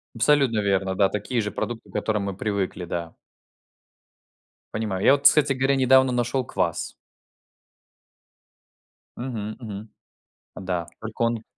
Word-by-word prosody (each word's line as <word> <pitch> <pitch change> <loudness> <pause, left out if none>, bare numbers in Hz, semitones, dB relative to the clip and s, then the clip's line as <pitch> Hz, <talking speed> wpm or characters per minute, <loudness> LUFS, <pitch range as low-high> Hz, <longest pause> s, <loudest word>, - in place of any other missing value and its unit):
Абсолютно 125 -1 +3
верно, 95 -2 0
да, 95 0 +4
такие 105 +5 -2
же 105 -1 -3
продукты, 120 -1 -5
к - - -17
которым 105 -2 -1
мы 100 -2 -3
привыкли, 100 -3 -2
да. 85 -1 -5 1.6
Понимаю. 105 -4 -2
Я - - +7
вот, 140 0 0
кстати 140 0 +6
говоря, 135 +1 +1
недавно 130 0 +5
нашёл 125 +1 0
квас. - - -2 2.3
Мгм, 110 -4 -4
мгм. 110 -2 -7 0.7
Да, 90 -3 -3
только 110 +1 -7
он 115 -1 +1
110 Hz, 125 wpm, -24 LUFS, 100-130 Hz, 2.3 s, Я